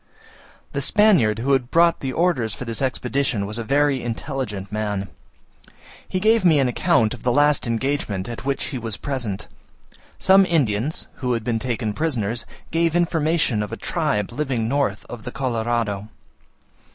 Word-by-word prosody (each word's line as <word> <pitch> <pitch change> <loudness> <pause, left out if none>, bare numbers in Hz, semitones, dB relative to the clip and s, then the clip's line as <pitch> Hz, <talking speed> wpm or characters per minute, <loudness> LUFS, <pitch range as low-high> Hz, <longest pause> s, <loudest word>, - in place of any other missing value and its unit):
The 140 - -2
Spaniard 175 - +4
who 135 +4 +2
brought 165 +7 +3
the 135 - -3
orders 130 - +1
for 125 - -7
this 115 +1 -3
expedition 130 -4 0
was 105 +3 -4
a - - -2
very 140 +1 +2
intelligent 115 -5 -4
man. 105 -2 -2 1.0
He 185 - -2
gave 220 +1 +3
me 165 -4 +5
an 135 -2 +3
account 115 -2 +2
of - - -9
the 125 - +1
last 145 +1 +3
engagement 115 -5 -1
at 120 -1 -6
which 140 0 -1
he 130 - -2
was 115 -2 -3
present. 120 -9 -3 0.7
Some 190 +1 +6
Indians, 145 - 0
who 125 -2 -1
had 115 -2 -2
been 115 -1 -1
taken 115 -3 -2
prisoners, 115 -5 -1 0.3
gave 165 0 +1
information 160 -8 +1
of 105 - -4
a - - -4
tribe 105 0 -1
living 125 -4 -1
north 130 -6 0
of 120 -2 -8
the 125 - -6
Colorado. 115 -5 -1
125 Hz, 160 wpm, -22 LUFS, 110-145 Hz, 1.0 s, Some